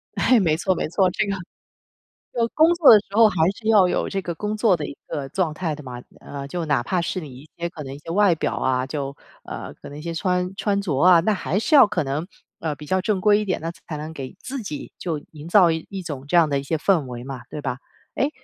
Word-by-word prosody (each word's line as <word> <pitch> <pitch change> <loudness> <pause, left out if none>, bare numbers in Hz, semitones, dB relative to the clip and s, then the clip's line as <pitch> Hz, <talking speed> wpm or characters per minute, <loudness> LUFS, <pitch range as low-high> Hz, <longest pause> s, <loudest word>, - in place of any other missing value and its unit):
哎， 250 -3 +4
没 160 -4 +2
错 185 +1 +1
没 - - -2
错， 185 +1 +3
这 210 - 0
个 200 - -2 1.0
就 235 -2 +1
工 320 +2 +5
作 325 -7 +7
的 210 - +8
时 - - -14
候 225 -1 +7
还 205 - -3 0.2
是 220 - -6
要 205 -5 +6
有 - - 0
这 195 -1 -2
个 170 -2 -5
工 210 +3 -3
作 210 -5 +3
的 150 - -4
一 140 - -7
个 140 -2 -4
状 175 -5 -1
态 160 -1 -2
的 150 - -11
嘛。 125 -1 -8 0.2
呃， 140 -1 -7
就 175 +3 -3
哪 140 -5 +1
怕 180 +6 0
是 185 - -2
你 155 -5 -8
一 150 +1 -16
些 170 0 -3
可 155 -4 -8
能 135 0 -7
一 - - -9
些 165 +3 -8
外 195 -2 +4
表 - - -2
啊， 130 0 0
就， 140 -1 -4 0.3
呃， - - -7
可 - - -9
能 145 - -9
一 - - -8
些 170 +1 -4
穿 180 +2 -1
穿 200 0 0
着 155 -9 -1
啊。 175 -2 +7
那 215 +4 +2
还 190 0 -2
是 265 +8 -2
要 265 -7 +9
可 180 -6 -1
能， 145 +6 -3 0.3
呃， 155 -2 -2
比 150 - -11
较 185 +3 +1
正 200 -1 0
规 210 +1 +4
一 210 - -2
点， 185 - -1
那 165 +1 -3 0.2
才 155 - -4
能 155 +2 -6
给 135 -4 -7
自 265 -1 -5
己 150 -8 -7
就 165 -4 -2
营 155 0 -10
造 175 -2 +6
一 180 +4 -5
种 140 -3 -6
这 175 - +3
样 165 -2 +6
的 140 -1 +1
一 - - -6
些 160 +3 -1
氛 165 -3 +2
围 120 -1 -7
嘛， 130 -2 -7
对 150 - -6
吧？ 125 - -3 0.4
哎， 280 - +1
170 Hz, 285 characters per minute, -23 LUFS, 150-195 Hz, 1.0 s, 要